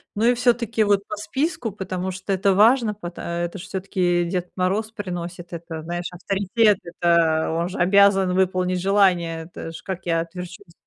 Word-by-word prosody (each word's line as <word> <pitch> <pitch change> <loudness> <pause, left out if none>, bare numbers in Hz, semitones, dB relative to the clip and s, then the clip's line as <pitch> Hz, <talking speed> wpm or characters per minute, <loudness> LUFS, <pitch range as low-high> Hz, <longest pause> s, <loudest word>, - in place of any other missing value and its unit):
Ну 220 +3 +1
и 245 - +5
всё-таки, 235 -2 +1
вот 205 -1 +2
по - - -4
списку, 240 +2 -2
потому 185 -1 -4
что 190 +2 -3
это 195 +1 +2
важно, 225 0 +4
пат 175 -4 -8
это 170 +2 -3
ж - - -7
всё-таки 180 -2 0
Дед 180 0 -3
Мороз 200 +4 0
приносит, 175 -4 -6
это 165 -1 -6
знаешь, 175 +1 -4
авторитет, 195 +3 +1
это 170 -2 +2
он 170 +2 -1
же 190 - -7
обязан 195 0 +4
выполнить 185 -1 +1
желание. 180 -4 +2
Это 165 -1 -8
ж 165 - -10
как 185 -2 -6
я 165 -1 +2
отверчусь 180 - -9
185 Hz, 170 wpm, -23 LUFS, 175-205 Hz, -, и